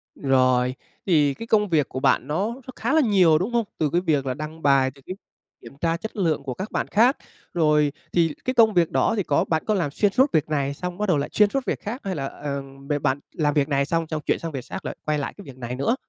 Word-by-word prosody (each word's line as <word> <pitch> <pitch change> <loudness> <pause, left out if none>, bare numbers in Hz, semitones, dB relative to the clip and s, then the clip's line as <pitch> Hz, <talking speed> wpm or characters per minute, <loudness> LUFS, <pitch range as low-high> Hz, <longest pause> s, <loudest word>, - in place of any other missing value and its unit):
Rồi, 130 -2 +2 0.3
thì 150 -6 +3
cái 230 +11 -9
công 210 -3 +2
việc 155 -5 +2
của 130 - -4
bạn - - +2
nó 195 +10 -1
nó 265 - -14
khá 280 - -1
là 315 - +5
nhiều, 185 - +4
đúng 190 +8 -2
không? 235 - +2
Từ 155 -3 +1
cái 175 +4 +1
việc 150 -6 +1
là 130 - -1
đăng 155 +4 -7
bài 135 -2 +3 0.7
kiểm 135 - -13
tra 165 0 +1
chất 220 +6 -7
lượng 160 -7 0
của 130 -3 -4
các 190 - -6
bạn - - -1
khác. 240 +6 +3 0.4
Rồi, 150 -3 +3 0.2
thì 165 -3 +2
cái 255 - 0
công 225 -3 +5
việc 170 -3 +2
đó - - +2
thì 200 - +1
có 145 - +1
bạn 160 -1 -1
có 215 - +1
làm 170 -8 0
xuyên 205 +7 +1
suốt 265 +6 +3
việc 155 -1 +1
này 140 -2 0
xong 180 +3 -5
bắt 210 0 -1
đầu 155 - +3
lại 140 - -2
xuyên 210 -1 +5
suốt 270 +3 -2
việc - - -2
khác 230 +5 -6
hay 190 -2 -3
là, 135 - -3
ờm, 140 -1 -7
b - - -4
bạn 130 +2 +1
làm 150 -2 0
việc 145 -1 +2
này 140 -1 +2
xong, 165 +1 -1
xong 155 -1 -3
chuyển - - +1
sang 165 -1 -5
việc 130 -4 -6
xác, - - -7
lại - - -4
quay 150 -1 +1
lại 140 - -4
cái 200 - -10
việc 135 -2 -11
này 125 0 -5
nữa? 140 - +1
155 Hz, 270 wpm, -24 LUFS, 140-200 Hz, 0.7 s, là